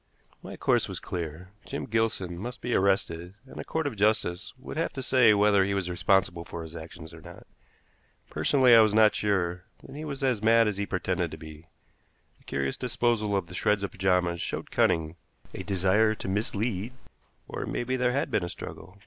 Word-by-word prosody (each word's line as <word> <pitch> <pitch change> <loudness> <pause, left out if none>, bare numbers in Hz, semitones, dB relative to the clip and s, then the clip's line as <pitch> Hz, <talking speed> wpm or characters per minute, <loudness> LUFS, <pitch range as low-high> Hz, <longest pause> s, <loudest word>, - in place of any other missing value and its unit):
My - - -9
course - - +2
was - - -4
clear. 85 +1 -6
Jim - - -5
Gilson 110 -5 -1
must 120 +8 -6
be 120 - -3
arrested, 95 -2 0
and 135 - -11
a - - -4
court 160 -1 -2
of 140 -6 -2
justice 100 -3 0
would 130 - -9
have 165 - -1
to 135 - -5
say 125 -4 +5
whether 100 -1 +4
he 100 +1 -1
was 90 -2 -2
responsible 90 -1 +1
for 85 0 -7
his 80 0 -10
actions 80 0 -10
or 80 - -12
not. 85 +1 -12 0.8
Personally, 130 -3 +3
I 115 - +9
was 110 -1 +3
not 110 -1 +6
sure 90 -4 -1 0.2
that - - -11
he 150 - -6
was 140 -3 -5
as 125 -6 +1
mad 115 +1 +5
as 105 -2 -2
he 100 0 -2
pretended - - -1
to - - -8
be. 80 +1 -12 0.7
The - - -27
curious 70 -1 -2
disposal 120 -4 0
of 95 -3 0
the 90 - -12
shreds 100 +2 +1
of 100 - -3
pajamas 90 -2 +1
showed - - -4
cunning, 80 +1 +1 0.4
a - - -5
desire 100 +3 +2
to - - -7
mislead, 105 +2 -2 0.5
or - - -5
it - - -4
may - - -2
be 130 +2 -1
there 125 -1 +1
had 140 - -1
been 100 - +1
a 85 - -3
struggle. 95 +2 -9
100 Hz, 205 wpm, -27 LUFS, 90-115 Hz, 0.8 s, I